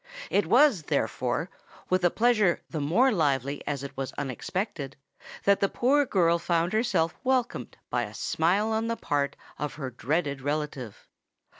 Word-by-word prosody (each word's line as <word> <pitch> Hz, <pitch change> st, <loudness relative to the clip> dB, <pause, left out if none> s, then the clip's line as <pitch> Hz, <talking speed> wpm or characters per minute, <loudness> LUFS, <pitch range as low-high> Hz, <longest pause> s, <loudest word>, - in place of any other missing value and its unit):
It 200 Hz, -4 st, +2 dB
was, 245 Hz, -, +5 dB
therefore, 150 Hz, -, -1 dB, 0.4 s
with 185 Hz, 0 st, +1 dB
a 175 Hz, -, +5 dB
pleasure 215 Hz, -4 st, +3 dB
the 160 Hz, -, -2 dB
more 210 Hz, -, +3 dB
lively 140 Hz, -, 0 dB
as 140 Hz, -2 st, -2 dB
it 140 Hz, -, -7 dB
was 135 Hz, -1 st, -4 dB
unexpected, 145 Hz, -, -4 dB, 0.5 s
that 200 Hz, 0 st, +4 dB
the 200 Hz, -, +2 dB
poor 280 Hz, +3 st, +2 dB
girl 170 Hz, -5 st, +3 dB
found 170 Hz, +2 st, 0 dB
herself 195 Hz, -8 st, +1 dB
welcomed 255 Hz, -2 st, -1 dB
by -, -, +1 dB
a -, -, -10 dB
smile 190 Hz, +7 st, +1 dB
on 220 Hz, +1 st, 0 dB
the 230 Hz, 0 st, -1 dB
part 145 Hz, -2 st, -1 dB, 0.2 s
of 150 Hz, -1 st, -3 dB
her 135 Hz, -4 st, -5 dB
dreaded 140 Hz, +3 st, -1 dB
relative. 145 Hz, -5 st, -4 dB
170 Hz, 155 wpm, -27 LUFS, 145-215 Hz, 0.5 s, was